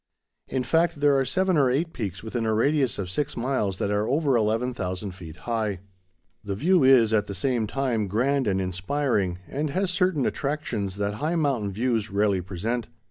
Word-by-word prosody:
In 130 -1 -1
fact 165 +3 +1
there 145 -1 +4
are 135 -1 +2
seven 185 +5 +1
or 135 -3 +4
eight 160 +6 0
peaks 100 -4 -5
within 115 +1 -3
a 110 - +2
radius 140 +3 +2
of 95 - -3
six 135 +11 -2
miles 115 -6 -1
that 100 - -1
are 105 +1 0
over 140 -1 +2
11,000 110 -4 -1
feet 85 -4 -10
high. 110 -2 -2 0.6
The 100 -1 -3
view 170 - +3
is, 125 -4 +6
at 105 -1 +2
the 100 - -5
same 120 -2 0
time, 120 -4 -1
grand 130 +7 +1
and 95 -1 +1
inspiring, 95 +1 -1
and 150 +2 -2
has 185 +5 0
certain 180 -6 +1
attractions 130 - -2
that 100 0 -1
high 160 +3 0
mountain 135 -11 0
views 115 +1 0
rarely 100 -1 +1
present. 105 +7 -3
120 Hz, 185 wpm, -25 LUFS, 100-140 Hz, 0.6 s, is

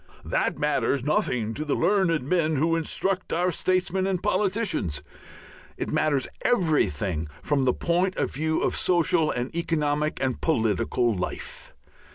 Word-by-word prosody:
That - - 0
matters 140 -2 0
nothing 125 -6 0
to 150 - -4
the 150 - 0
learned 175 -4 +2
men 160 +2 +1
who 165 +4 +2
instruct 185 +3 -1
our 180 +2 +1
statesmen 185 +2 0
and 185 -2 -1
politicians. 190 - 0 0.7
It - - -3
matters 145 -4 +1
everything 100 - +1 0.2
from 140 -3 +1
the 125 - +3
point 180 +2 0
of - - -1
view 160 +3 0
of - - 0
social 170 -2 +2
and 125 +5 -3
economic 150 -3 0
and 130 -2 -1
political 115 - +1
life. 90 -3 -6
155 Hz, 140 wpm, -25 LUFS, 130-180 Hz, 0.7 s, the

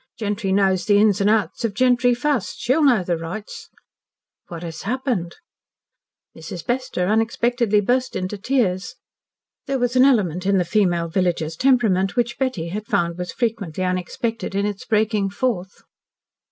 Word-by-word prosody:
"Gentry 205 -2 -2
knows 190 -2 +2
the 205 -1 +4
ins 205 -1 +3
an' 200 - +3
outs 220 +2 0
of 220 -4 -1
gentry 245 0 +3
fust. 245 -5 -1
She'll 260 +6 +1
know 245 -9 +4
the 175 -2 -1
rights." 180 +6 -7 0.8
"What 170 -1 -8
has 165 -2 -6
happened?" 230 -7 -2 1.0
Mrs. 160 +1 -8
Bester 250 -7 -1
unexpectedly 225 +1 +1
burst 255 +5 0
into 185 +2 -3
tears. 200 -4 -1 0.7
There 275 -1 0
was 245 0 -1
an 255 - +6
element 190 - +2
in 200 -1 +3
the 180 - +1
female 175 -4 +1
villagers' 165 -2 -1
temperament 215 -6 +2
which 240 -1 -1
Betty 250 -12 -1
had 210 +3 -5
found 170 0 0
was 180 -1 -4
frequently 210 -8 -2
unexpected 185 +3 -3
in 200 +1 +1
its 205 +3 -4
breaking 215 -3 +1
forth. 200 -3 -3
205 Hz, 155 wpm, -22 LUFS, 185-240 Hz, 1.0 s, an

